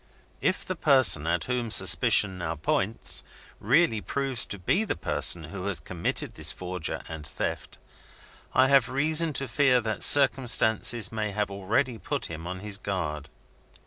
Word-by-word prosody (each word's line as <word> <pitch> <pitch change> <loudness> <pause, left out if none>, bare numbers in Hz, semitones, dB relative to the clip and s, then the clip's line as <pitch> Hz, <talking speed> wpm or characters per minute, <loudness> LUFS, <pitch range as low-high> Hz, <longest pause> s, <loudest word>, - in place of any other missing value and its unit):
"If 185 - -1
the 185 - -4
person, 130 - +4
at 85 0 -1
whom 125 -2 -3
suspicion 95 -2 +4
now 85 -2 -4
points, 95 +7 -2 0.4
really 115 - +1
proves 135 -2 -2
to 100 - -5
be 180 - 0
the 220 - -3
person 75 +1 0
who 90 +4 -8
has 100 -3 -2
committed 85 -2 -3
this - - -1
forger 90 -3 -5
and 80 -2 -8
theft, - - -5 0.7
I 130 +1 +3
have 135 -3 +3
reason 155 +5 +1
to 135 0 -3
fear 130 0 +2
that 110 -1 -4
circumstances 120 -4 +4
may 110 -2 -4
have 105 0 -2
already 110 +5 -2
put 85 - -4
him 80 +1 -8
on 90 0 -7
his 105 -1 -4
guard. 75 -8 -5
105 Hz, 155 wpm, -26 LUFS, 90-130 Hz, 0.7 s, person